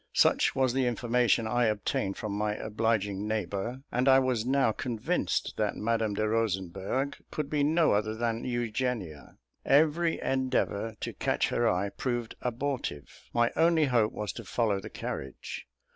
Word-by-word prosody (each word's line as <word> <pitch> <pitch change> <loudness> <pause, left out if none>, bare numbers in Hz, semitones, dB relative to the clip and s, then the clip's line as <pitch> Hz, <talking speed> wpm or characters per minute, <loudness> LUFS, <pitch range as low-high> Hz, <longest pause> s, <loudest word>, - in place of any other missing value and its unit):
Such - - +4
was 130 -2 +2
the 130 -1 +2
information 120 -1 +2
I 120 +2 +2
obtained 105 -2 -1
from 105 - -4
my 105 +1 -1
obliging 105 -2 -1
neighbour; 110 +4 -3
and 125 +2 +1
I 135 - +8
was 125 -3 +1
now 135 -3 +3
convinced 115 0 -1
that - - 0
Madame 110 -1 0
de 110 +1 0
Rosenberg 105 +4 -1
could 150 -2 -4
be 150 -2 +2
no 160 +2 +3
other 110 +1 +1
than 115 0 -1
Eugenia. 120 - -3 0.3
Every 160 +4 +3
endeavour 130 -5 0
to - - -3
catch - - 0
her 120 -1 +2
eye 90 +2 0
proved 120 0 -3
abortive. 125 - -4
My 120 0 +2
only 165 -2 +4
hope 120 -5 +2
was 105 -1 -4
to - - -7
follow 110 -5 0
the 105 +3 -8
carriage. 65 -8 -6
115 Hz, 155 wpm, -29 LUFS, 105-130 Hz, 0.3 s, I